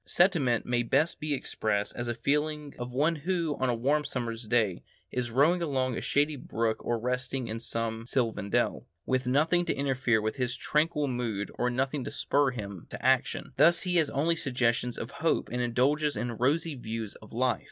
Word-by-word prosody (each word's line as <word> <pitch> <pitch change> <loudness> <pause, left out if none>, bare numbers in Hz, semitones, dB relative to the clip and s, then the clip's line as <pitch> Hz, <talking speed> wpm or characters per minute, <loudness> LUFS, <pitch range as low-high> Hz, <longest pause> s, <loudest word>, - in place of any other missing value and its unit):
Sentiment 160 - +3
may 120 -1 +1
best 150 +8 +1
be 150 0 -3
expressed 105 -6 -1
as 120 - -3
the 120 - -1
feeling 150 +3 -1
of 120 0 -5
one 155 +6 +1
who, 165 -1 -1
on 130 -1 +1
a 120 - +1
warm 140 +6 +1
summer's 115 -4 -4
day, 110 -6 +1 0.3
is 125 -1 -1
rowing 150 +9 +3
along 130 -6 0
a - - -3
shady 145 +1 +1
brook 115 -4 -2
or 120 - 0
resting 125 +1 -2
in 110 +1 -4
some 115 -1 -3
sylvan 115 -6 -1
dell, - - 0 0.2
with 130 -1 0
nothing 155 +7 +3
to - - -1
interfere 130 -4 +1
with 110 +4 -2
his 125 -1 -1
tranquil 150 +1 +1
mood 115 -6 -2
and 125 0 +1
nothing 135 +1 0
to - - -4
spur 140 -1 +2
him 105 -6 -5
on - - -17
to - - -8
action; - - +1
thus 165 +5 +6
he 180 -2 +1
has 160 -3 +3
only 160 +5 +1
suggestions 125 -4 0
of 115 - -5
hope 140 +4 0
and 125 +1 -1
indulges 140 +5 +1
in 120 0 -2
rosy 145 +8 +1
views 115 -4 -5
of 110 - -14
life. 125 +1 +1
130 Hz, 195 wpm, -29 LUFS, 115-150 Hz, 0.3 s, thus